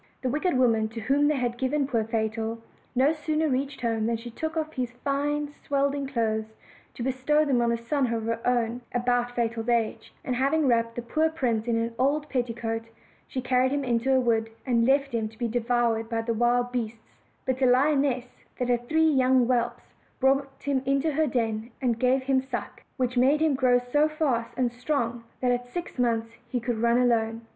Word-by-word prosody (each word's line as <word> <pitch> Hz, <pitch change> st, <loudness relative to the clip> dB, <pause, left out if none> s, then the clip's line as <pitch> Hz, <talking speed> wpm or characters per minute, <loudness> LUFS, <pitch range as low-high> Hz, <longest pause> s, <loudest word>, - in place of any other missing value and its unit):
The 255 Hz, -, +1 dB
wicked 300 Hz, +2 st, 0 dB
woman 225 Hz, -4 st, +3 dB
to 225 Hz, +1 st, -7 dB
whom 280 Hz, +6 st, +2 dB
they 300 Hz, -, +2 dB
had 245 Hz, -2 st, -2 dB
given 275 Hz, +2 st, +1 dB
poor 235 Hz, -5 st, 0 dB
Fatal 225 Hz, 0 st, -2 dB, 0.4 s
no 270 Hz, +5 st, +4 dB
sooner 310 Hz, 0 st, -1 dB
reached 275 Hz, 0 st, -2 dB
home 225 Hz, -2 st, 0 dB
than 230 Hz, 0 st, 0 dB
she 235 Hz, +1 st, -9 dB
took 315 Hz, +7 st, -4 dB
off 315 Hz, 0 st, -2 dB
his 250 Hz, -1 st, -3 dB
fine 285 Hz, +3 st, -1 dB, 0.2 s
swaddling 280 Hz, 0 st, 0 dB
clothes, 220 Hz, -4 st, -1 dB, 0.4 s
to 235 Hz, -, -5 dB
bestow 265 Hz, +4 st, +2 dB
them 260 Hz, -4 st, +2 dB
on 235 Hz, 0 st, +2 dB
a 235 Hz, -, +1 dB
son 250 Hz, +1 st, -1 dB
of 225 Hz, -1 st, -1 dB
her 230 Hz, 0 st, -2 dB
own 240 Hz, -1 st, 0 dB
about 245 Hz, 0 st, +1 dB
Fatal's 230 Hz, -1 st, -1 dB
age; 230 Hz, -2 st, 0 dB
and 250 Hz, -, -1 dB
having 280 Hz, +5 st, +2 dB
wrapped 230 Hz, -2 st, +2 dB
the 240 Hz, -, -4 dB
poor 315 Hz, +7 st, +1 dB
prince 245 Hz, -8 st, -1 dB
in 235 Hz, -, +1 dB
an 230 Hz, 0 st, -1 dB
old 290 Hz, +3 st, +1 dB
petticoat, 230 Hz, -3 st, -2 dB, 0.4 s
she 255 Hz, -, -4 dB
carried 255 Hz, +1 st, +2 dB
him 285 Hz, 0 st, 0 dB
into 245 Hz, +1 st, +1 dB
a 260 Hz, -, +5 dB
wood, 225 Hz, -3 st, +1 dB, 0.2 s
and 235 Hz, -3 st, +2 dB
left 275 Hz, +1 st, +3 dB
him 225 Hz, -2 st, 0 dB
to 220 Hz, -, -19 dB
be 240 Hz, 0 st, -1 dB
devoured 230 Hz, -1 st, 0 dB
by 225 Hz, -1 st, -1 dB
the 230 Hz, 0 st, -1 dB
wild 240 Hz, +2 st, +2 dB
beasts; 230 Hz, -2 st, -5 dB, 0.3 s
but 260 Hz, 0 st, -1 dB
a 260 Hz, -, +5 dB
lioness, 270 Hz, -1 st, +3 dB, 0.3 s
that 250 Hz, -1 st, -1 dB
had 240 Hz, 0 st, 0 dB
three 320 Hz, 0 st, +4 dB
young 260 Hz, -4 st, +4 dB
whelps, 240 Hz, -1 st, -1 dB, 0.3 s
brought 275 Hz, +1 st, +2 dB
him 280 Hz, -2 st, 0 dB
into 275 Hz, +3 st, +1 dB
her 310 Hz, +2 st, +1 dB
den, 225 Hz, -3 st, -1 dB
and 240 Hz, -4 st, 0 dB
gave 260 Hz, +2 st, +2 dB
him 265 Hz, 0 st, +2 dB
suck; 255 Hz, -5 st, -6 dB, 0.2 s
which 250 Hz, -1 st, -1 dB
made 275 Hz, +4 st, +4 dB
him 315 Hz, -2 st, +3 dB
grow 255 Hz, -2 st, +4 dB
so 245 Hz, +5 st, +2 dB
fast 275 Hz, -7 st, -1 dB
and 250 Hz, -2 st, +1 dB
strong 240 Hz, -2 st, -2 dB, 0.2 s
that 250 Hz, -1 st, +2 dB
at 245 Hz, 0 st, -1 dB
six 340 Hz, +1 st, -6 dB
months 230 Hz, -2 st, 0 dB
he 245 Hz, -, -1 dB
could 235 Hz, -1 st, -2 dB
run 235 Hz, +1 st, +3 dB
alone. 230 Hz, -2 st, +1 dB
245 Hz, 205 wpm, -26 LUFS, 230-275 Hz, 0.4 s, a